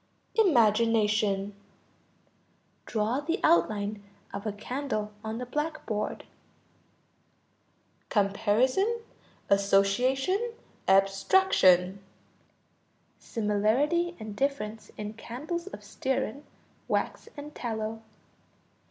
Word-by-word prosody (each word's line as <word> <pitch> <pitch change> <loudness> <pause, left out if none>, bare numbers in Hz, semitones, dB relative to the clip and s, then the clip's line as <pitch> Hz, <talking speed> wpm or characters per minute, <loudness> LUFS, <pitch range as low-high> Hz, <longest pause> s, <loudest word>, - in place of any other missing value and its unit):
Imagination. 215 - +3 1.3
Draw 220 +4 0
the 325 +6 -2
outline 210 -10 +2 0.3
of 200 +2 -4
a - - 0
candle 215 0 -3
on 220 +1 -4
the 250 - -4
blackboard. 295 -6 -3 1.9
Comparison, 240 - +2 0.5
association, 250 - +2 0.3
abstraction. 195 - +4 1.2
Similarity 240 - +1
and 215 -1 -7
difference 225 -6 -2
in 210 0 -5
candles 300 - -5
of - - -9
stearine, 265 +1 -2 0.4
wax, - - -1
and 295 +1 -8
tallow. 220 -3 -4
225 Hz, 75 wpm, -28 LUFS, 205-290 Hz, 1.9 s, abstraction